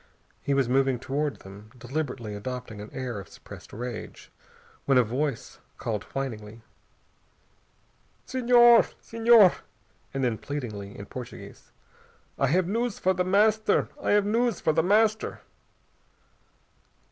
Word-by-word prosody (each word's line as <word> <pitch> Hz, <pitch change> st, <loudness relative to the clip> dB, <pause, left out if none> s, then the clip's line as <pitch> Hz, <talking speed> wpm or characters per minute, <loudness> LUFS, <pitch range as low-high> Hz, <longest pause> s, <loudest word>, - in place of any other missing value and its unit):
He 140 Hz, -, 0 dB
was 135 Hz, -3 st, +2 dB
moving 135 Hz, 0 st, +2 dB
toward 140 Hz, +4 st, -3 dB
them, 100 Hz, +2 st, -13 dB
deliberately 125 Hz, -5 st, -4 dB
adopting 115 Hz, 0 st, -6 dB
an 105 Hz, -, -9 dB
air 125 Hz, -5 st, -4 dB
of 100 Hz, -, -11 dB
suppressed -, -, -13 dB
rage, 120 Hz, 0 st, -7 dB, 0.5 s
when 135 Hz, -2 st, +3 dB
a 125 Hz, -, +6 dB
voice 130 Hz, +3 st, -3 dB, 0.2 s
called 105 Hz, -3 st, -3 dB
whiningly. 115 Hz, -5 st, -6 dB, 1.6 s
"Senhor! 240 Hz, -2 st, +6 dB, 0.2 s
Senhor!" 225 Hz, -4 st, +5 dB, 0.5 s
And 135 Hz, -1 st, -3 dB
then 120 Hz, -3 st, 0 dB
pleadingly, 105 Hz, -9 st, -6 dB
in 100 Hz, -, -8 dB
Portuguese, 125 Hz, +2 st, -10 dB, 0.7 s
"I 135 Hz, -, +3 dB
have 175 Hz, +5 st, +2 dB
news 230 Hz, +2 st, -1 dB
for 185 Hz, -, +1 dB
The 180 Hz, 0 st, 0 dB
Master! 215 Hz, +4 st, +2 dB
I -, -, +1 dB
have 205 Hz, -1 st, +3 dB
news 230 Hz, 0 st, +1 dB
for 155 Hz, -, +1 dB
The 160 Hz, -, +3 dB
Master!" 215 Hz, +4 st, +1 dB
135 Hz, 125 wpm, -26 LUFS, -, 1.6 s, a